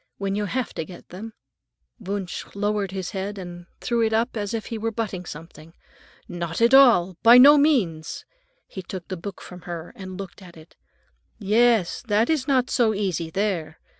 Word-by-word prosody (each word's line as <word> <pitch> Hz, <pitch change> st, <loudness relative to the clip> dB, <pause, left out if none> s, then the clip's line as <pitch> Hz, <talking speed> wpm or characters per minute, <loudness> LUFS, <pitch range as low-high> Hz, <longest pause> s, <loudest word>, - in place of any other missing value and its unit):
When 195 Hz, 0 st, -2 dB
you 205 Hz, +1 st, -1 dB
have 250 Hz, +4 st, -3 dB
to -, -, -3 dB
get 175 Hz, +2 st, -13 dB
them?" 215 Hz, +5 st, -9 dB, 0.7 s
Wunsch 200 Hz, -3 st, -5 dB
lowered 205 Hz, -1 st, -1 dB
his 190 Hz, -1 st, -5 dB
head 200 Hz, 0 st, -4 dB
and 175 Hz, -1 st, -9 dB
threw 235 Hz, -1 st, -1 dB
it 220 Hz, -1 st, +1 dB
up 230 Hz, +3 st, 0 dB
as 205 Hz, -2 st, -3 dB
if 225 Hz, -2 st, -3 dB
he 225 Hz, -, -5 dB
were 225 Hz, +1 st, -1 dB
butting 205 Hz, -6 st, -4 dB
something. 165 Hz, +1 st, -11 dB, 0.5 s
"Not 170 Hz, -1 st, -4 dB
at 235 Hz, +2 st, +4 dB
all! 205 Hz, -10 st, +6 dB
By 235 Hz, +2 st, +8 dB
no 280 Hz, +4 st, +9 dB
means." 235 Hz, -, +1 dB, 0.4 s
He 190 Hz, -, -8 dB
took 185 Hz, -1 st, -8 dB
the 190 Hz, -, -3 dB
book 185 Hz, +2 st, -8 dB
from 180 Hz, 0 st, -11 dB
her 170 Hz, -1 st, -6 dB
and 185 Hz, -1 st, -8 dB
looked 195 Hz, 0 st, -9 dB
at 175 Hz, -3 st, -14 dB
it. 160 Hz, +1 st, -17 dB, 0.6 s
"Yes, 220 Hz, -2 st, +2 dB
that 220 Hz, +5 st, +2 dB
is 305 Hz, -4 st, 0 dB
not 255 Hz, -3 st, +1 dB
so 225 Hz, -3 st, +2 dB
easy, 185 Hz, -5 st, -2 dB
there. 170 Hz, -4 st, -2 dB
200 Hz, 185 wpm, -24 LUFS, 175-225 Hz, 0.7 s, no